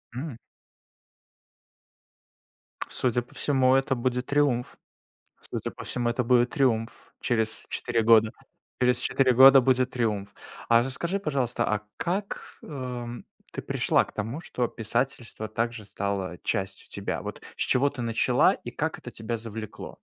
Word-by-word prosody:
М. 130 Hz, -3 st, -5 dB, 2.5 s
Судя 125 Hz, -2 st, 0 dB
по 120 Hz, -, -18 dB
всему, 130 Hz, -2 st, +3 dB
это 135 Hz, 0 st, +2 dB
будет 125 Hz, +1 st, -1 dB
триумф. 140 Hz, -4 st, +1 dB, 0.6 s
Судя -, -, -5 dB
по -, -, -10 dB
всему, 120 Hz, -1 st, -1 dB
это 125 Hz, +1 st, -1 dB
будет 125 Hz, 0 st, +4 dB
триумф. 120 Hz, -6 st, 0 dB
Через 110 Hz, -2 st, 0 dB
4 120 Hz, -2 st, 0 dB
года. 110 Hz, -1 st, +5 dB, 0.5 s
Через 125 Hz, -1 st, +3 dB
4 130 Hz, -2 st, +2 dB
года 135 Hz, +2 st, +9 dB
будет 130 Hz, 0 st, +2 dB
триумф. 105 Hz, -5 st, -2 dB, 0.3 s
А 115 Hz, 0 st, +6 dB
расскажи, 170 Hz, +9 st, -2 dB
пожалуйста, 135 Hz, -9 st, -1 dB
а 105 Hz, 0 st, 0 dB
как, 195 Hz, +4 st, -4 dB
эм, 125 Hz, -4 st, -6 dB, 0.3 s
ты -, -, -4 dB
пришла -, -, +2 dB
к -, -, -15 dB
тому, 115 Hz, +8 st, -4 dB
что 125 Hz, -7 st, -2 dB
писательство 115 Hz, -1 st, -3 dB
также 115 Hz, 0 st, -2 dB
стало 95 Hz, -3 st, -3 dB
частью 95 Hz, 0 st, -2 dB
тебя? -, -, -4 dB
Вот, -, -, -7 dB
с -, -, -11 dB
чего 140 Hz, +3 st, +3 dB
ты 135 Hz, -4 st, -6 dB
начала 115 Hz, -1 st, +3 dB
и -, -, -7 dB
как -, -, -2 dB
это -, -, -9 dB
тебя 110 Hz, +1 st, -4 dB
завлекло? 110 Hz, -1 st, -7 dB
120 Hz, 140 wpm, -27 LUFS, 115-130 Hz, 2.5 s, года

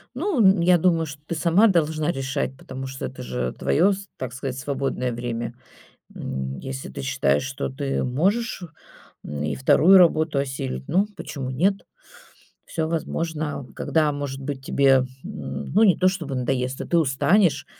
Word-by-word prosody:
Ну, 250 Hz, -, +3 dB
я 180 Hz, +1 st, +5 dB
думаю, 165 Hz, -1 st, +2 dB
что 145 Hz, -1 st, -9 dB
ты 170 Hz, -, -2 dB
сама 175 Hz, +7 st, +4 dB
должна 160 Hz, -3 st, +1 dB
решать, 135 Hz, -1 st, -3 dB
потому 130 Hz, 0 st, -7 dB
что 135 Hz, 0 st, -6 dB
это 130 Hz, -, -7 dB
же 65 Hz, -, -3 dB
твое 190 Hz, +6 st, +2 dB
с 195 Hz, +1 st, -8 dB
так 125 Hz, -2 st, -5 dB
сказать, 130 Hz, 0 st, -4 dB
свободное 135 Hz, -2 st, -2 dB
время. 120 Hz, 0 st, -4 dB, 0.6 s
М, 65 Hz, 0 st, -4 dB
если 65 Hz, 0 st, -6 dB
ты 70 Hz, -, -7 dB
считаешь, 70 Hz, +2 st, +1 dB
что 135 Hz, 0 st, -4 dB
ты 135 Hz, 0 st, -2 dB
можешь, 190 Hz, -, 0 dB, 0.6 s
м, 75 Hz, 0 st, -4 dB
и 75 Hz, -1 st, -1 dB
2 170 Hz, -, +6 dB
работу 160 Hz, -4 st, +4 dB
осилить, 65 Hz, -, -3 dB
ну, 195 Hz, +3 st, +2 dB
почему 135 Hz, -3 st, -5 dB
нет? 190 Hz, +9 st, +1 dB, 0.8 s
Всё 160 Hz, -1 st, -2 dB
возможно. 160 Hz, -3 st, -3 dB
Когда, 155 Hz, -2 st, +1 dB
может 140 Hz, -1 st, -5 dB
быть, 135 Hz, -1 st, -5 dB
тебе, 135 Hz, -2 st, +4 dB, 0.2 s
м, 205 Hz, +1 st, -6 dB
ну, 210 Hz, -, +4 dB
не 190 Hz, -5 st, +5 dB
то 185 Hz, -, +4 dB
чтобы 165 Hz, -7 st, -3 dB
надоест, 130 Hz, 0 st, -1 dB
а -, -, -4 dB
ты 170 Hz, -, +2 dB
устанешь 145 Hz, +1 st, +2 dB
140 Hz, 160 wpm, -24 LUFS, 130-170 Hz, 0.8 s, 2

